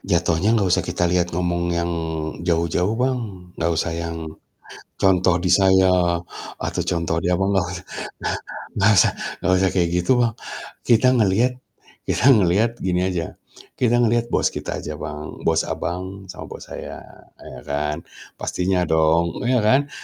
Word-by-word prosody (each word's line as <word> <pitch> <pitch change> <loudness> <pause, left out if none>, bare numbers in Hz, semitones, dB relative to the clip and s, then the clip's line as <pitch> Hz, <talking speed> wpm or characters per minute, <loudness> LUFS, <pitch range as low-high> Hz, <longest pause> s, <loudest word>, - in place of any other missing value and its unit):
jatuhnya 85 +1 +1
gak 100 - +2
usah - - +4
kita 90 - -2
lihat 90 -1 +2
ngomong 85 -1 0
yang 85 0 -1 0.6
jauh-jauh, 85 +4 +1
Bang, 115 -8 -3
gak 85 - +2
usah 85 +1 -1
yang 85 0 -4 0.8
contoh 90 -2 +3
di 90 +1 -2
saya 95 -1 +5 0.7
atau - - -2
contoh 85 -1 -1
di 90 - 0
Abang, 95 +2 +1
gak 95 - +3
us 90 - -5 1.1
gak 110 - +7
usah 90 - +5 0.3
gak - - 0
usah 95 0 +3
kayak 85 -3 +2
gitu, 90 +8 +1
Bang. 115 -2 +1 0.5
Kita 120 +1 +4
ngelihat 115 +4 +2 0.5
kita - - -1
ngelihat 100 +4 +3
gini 90 -1 0
aja, 85 -3 -3 0.4
kita 120 -1 +2
ngeliat 120 0 +2
bos - - +1
kita - - -4
aja, 75 - -5
Bang, 75 0 -7
bos 80 0 +1
Abang, 95 +2 -5
sama - - -8
bos - - -10
saya, - - -7 0.4
ya 65 - -10
kan, 75 +3 -2 0.3
pastinya 90 0 0
dong, 80 +1 +2
iya 125 +1 +2
kan? 135 +6 +3
90 Hz, 155 wpm, -22 LUFS, 85-100 Hz, 1.1 s, gak